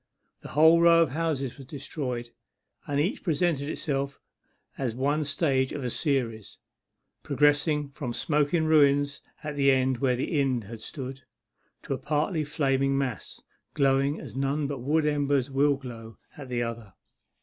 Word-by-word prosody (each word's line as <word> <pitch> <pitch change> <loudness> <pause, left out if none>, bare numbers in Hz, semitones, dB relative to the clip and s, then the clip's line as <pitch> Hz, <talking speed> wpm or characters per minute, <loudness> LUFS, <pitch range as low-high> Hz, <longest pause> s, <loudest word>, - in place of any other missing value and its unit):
The - - -9
whole 160 +2 +7
row 170 0 +7
of 150 - -3
houses 145 -4 -2
was 135 - -11
destroyed, 125 -4 -5 0.6
and 145 0 0
each 190 - 0
presented 155 -3 0
itself 140 -3 -3 0.6
as 125 -4 -3
one 145 +4 +1
stage 135 -3 0
of 145 - -4
a 125 - -2
series, 120 - -2 0.6
progressing 145 0 +2
from 140 -3 -5
smoking 150 +5 +1
ruins 145 -2 +3 0.2
at 150 -1 -4
the 140 -1 +3
end 130 -2 +2
where 130 -1 +2
the 140 +4 0
inn 130 -4 0
had 110 +2 -9
stood, 135 0 -7 0.6
to - - -3
a 130 - -4
partly 155 +4 0
flaming 135 -2 +1
mass 130 -5 -4 0.3
glowing 140 +1 +2
as - - -10
none 140 +2 0
but 140 -1 -3
wood 150 +5 +1
embers 145 -2 +1
will 140 +1 +3
glow 115 -5 -10 0.2
at 140 -3 -9
the 120 -1 -1
other. 115 -4 -6
140 Hz, 155 wpm, -27 LUFS, 130-150 Hz, 0.6 s, whole